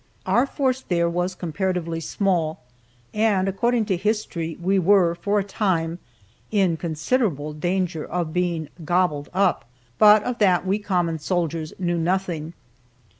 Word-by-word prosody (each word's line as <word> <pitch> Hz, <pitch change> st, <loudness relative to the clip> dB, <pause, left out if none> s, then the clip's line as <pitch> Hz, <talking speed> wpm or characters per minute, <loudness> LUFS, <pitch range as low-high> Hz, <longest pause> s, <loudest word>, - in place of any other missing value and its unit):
Our 250 Hz, +3 st, +3 dB
force 265 Hz, -2 st, 0 dB
there 170 Hz, -5 st, 0 dB
was 175 Hz, +2 st, -1 dB
comparatively 175 Hz, -1 st, -2 dB
small, 165 Hz, -2 st, -1 dB, 0.5 s
and, 210 Hz, -3 st, +2 dB
according 235 Hz, +4 st, +1 dB
to 195 Hz, -4 st, 0 dB
history, 175 Hz, -5 st, -2 dB
we 190 Hz, +3 st, +2 dB
were, 185 Hz, -2 st, +4 dB
for 200 Hz, +4 st, -1 dB
a 200 Hz, -, +2 dB
time, 180 Hz, -5 st, -1 dB, 0.5 s
in 195 Hz, -5 st, +2 dB
considerable 160 Hz, -, -1 dB
danger 175 Hz, 0 st, -1 dB
of 170 Hz, -3 st, -3 dB
being 175 Hz, -4 st, -1 dB
"gobbled 155 Hz, -3 st, 0 dB
up," 190 Hz, -1 st, +1 dB, 0.4 s
but 210 Hz, 0 st, +7 dB
of 250 Hz, -1 st, -3 dB
that 185 Hz, -4 st, +3 dB
we 195 Hz, +3 st, +1 dB
common 175 Hz, -5 st, -1 dB
soldiers 165 Hz, -1 st, -2 dB
knew 175 Hz, -2 st, -1 dB
nothing. 170 Hz, -2 st, -1 dB
180 Hz, 135 wpm, -23 LUFS, 165-200 Hz, 0.5 s, but